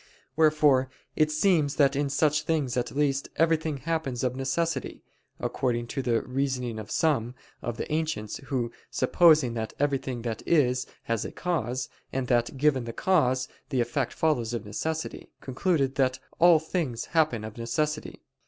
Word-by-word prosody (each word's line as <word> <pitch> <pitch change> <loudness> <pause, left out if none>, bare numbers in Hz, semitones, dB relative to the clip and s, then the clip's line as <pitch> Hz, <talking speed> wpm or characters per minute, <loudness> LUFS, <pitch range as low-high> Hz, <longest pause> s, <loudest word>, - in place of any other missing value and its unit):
Wherefore 150 -4 +4 0.3
it 155 -1 +3
seems 155 -2 +2
that 140 -2 +4
in 140 0 0
such 150 +1 +2
things 150 -5 -1
at 125 - 0
least, 140 -1 0
everything 160 -2 +1
happens 145 -4 -2
of 125 -1 0
necessity; 150 +6 -2 0.4
according 120 -2 -1
to 135 - -2
the 120 -3 +1
reasoning 125 -3 -2
of 110 - -8
some 130 -6 +1 0.3
of 120 -1 -4
the - - -3
ancients 155 -9 -2
who 125 -4 -2 0.2
supposing 150 -2 +4
that 110 -1 -4
everything 135 -4 -1
that 115 -2 -3
is, 130 -6 +2 0.2
has 115 -2 -1
a - - -5
cause; 130 -8 -2 0.2
and 135 -1 -1
that, 120 +2 +1
given 135 -3 +2
the 115 - -5
cause, 130 -9 +2 0.2
the 135 -4 0
effect 120 +2 0
follows 120 -8 0
of 115 -2 -5
necessity; 160 +10 -4
concluded 135 0 0
that 130 -1 +1 0.2
all 175 -1 +7
things 155 -6 -2
happen 150 -9 +2
of 110 -1 -7
necessity. 150 +6 -2
135 Hz, 155 wpm, -27 LUFS, 120-155 Hz, 0.4 s, all